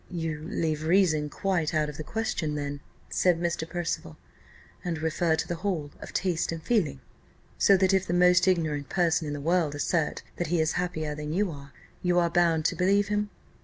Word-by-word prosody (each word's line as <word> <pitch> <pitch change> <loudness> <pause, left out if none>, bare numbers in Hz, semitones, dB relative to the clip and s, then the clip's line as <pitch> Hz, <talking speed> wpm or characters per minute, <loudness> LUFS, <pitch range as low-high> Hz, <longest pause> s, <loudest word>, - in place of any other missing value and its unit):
"You 160 -4 -3
leave 155 -7 -1
reason 160 -3 +3
quite 170 -3 -1
out 155 -1 +2
of 150 -1 -7
the 155 - -5
question, 165 -5 -2
then," 145 -1 -3 0.3
said 180 -2 +3
Mr. 170 -1 -2
Percival, 170 - -3 0.7
"and 175 -2 -2
refer 160 +1 +1
the 160 +2 -2
whole 165 -7 -2
to - - -9
taste 175 -4 0
and 165 - -4
feeling? 155 - 0 0.6
So 195 - +6
that 190 +1 +3
if 190 -1 +2
the 175 - -1
most 180 +1 +5
ignorant 155 -6 +1
person 165 -3 +1
in 145 - -3
the 145 - -4
world 160 -1 +1
assert 160 +2 -1
that 175 - -1
he 170 +1 +1
is 160 0 +2
happier 160 -4 -2
than 150 +1 -5
you 195 0 +1
are, 140 -1 -10 0.3
you 180 -1 +2
are 170 -1 +3
bound 165 -2 +2
to - - +2
believe 200 +2 +2
him." 210 0 0
165 Hz, 195 wpm, -27 LUFS, 155-180 Hz, 0.7 s, So